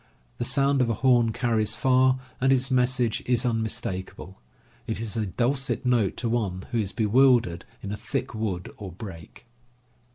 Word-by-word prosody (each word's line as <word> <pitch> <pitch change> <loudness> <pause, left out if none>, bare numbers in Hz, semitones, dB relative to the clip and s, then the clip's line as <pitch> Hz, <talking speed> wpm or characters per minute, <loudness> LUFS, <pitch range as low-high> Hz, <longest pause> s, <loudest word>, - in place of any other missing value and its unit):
The 120 - -1
sound 135 +2 +2
of 120 - +2
a 115 - +1
horn 120 -3 +3
carries 110 -2 0
far, 130 +1 +3 0.2
and 135 +1 +4
its 130 0 +1
message 125 -3 +1
is 125 0 +1
unmis 115 -2 0
takable. 95 0 -6 0.5
It 110 - -3
is 115 -1 -3
a 110 -2 -1
dulcet 130 +8 -1
note 120 -6 +2
to 120 - -2
one 100 -6 -2
who 120 - 0
is 100 -3 -2
bewildered 115 -4 +3 0.2
in 100 - -4
a 105 - -3
thick 130 +3 -4
wood 105 -5 -3
or 100 -3 -7
brake. 85 -1 -10
115 Hz, 170 wpm, -26 LUFS, 105-130 Hz, 0.5 s, and